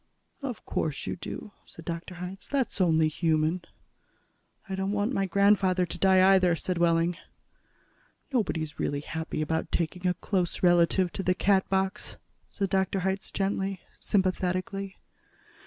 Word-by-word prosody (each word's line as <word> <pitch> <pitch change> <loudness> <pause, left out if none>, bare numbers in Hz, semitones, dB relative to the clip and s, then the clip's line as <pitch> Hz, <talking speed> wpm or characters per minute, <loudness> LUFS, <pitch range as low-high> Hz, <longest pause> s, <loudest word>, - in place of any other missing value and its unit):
"Of 255 -5 -5
course 150 -3 -2
you - - -2
do," 180 +4 -7 0.2
said 165 - -13
Dr. 170 +2 -5
Hitz. 180 +2 -7
"That's 265 -8 -1
only 160 -3 +4
human." 160 +2 +1 1.1
"I 195 - -5
don't 195 +1 -1
want 210 +5 0
my 195 -4 +1
grandfather 190 -2 +3
to 175 - -6
die, 190 +1 +6
either," 180 -3 +4
said 175 +2 -2
Wehling. 170 0 +2 1.2
"Nobody's 160 - -1
really 145 0 -1
happy 160 0 -3
about 160 +1 -2
taking 180 +2 -1
a 180 - +2
close 185 -3 -1
relative 175 +1 +4
to - - -3
the 185 -1 +1
Catbox," 190 0 +1 0.3
said 195 -2 -2
Dr. 190 0 +1
Hitz 190 +1 -2
gently, 195 -1 -1 0.2
sympathetically. 190 0 -1
185 Hz, 140 wpm, -28 LUFS, 170-195 Hz, 1.2 s, die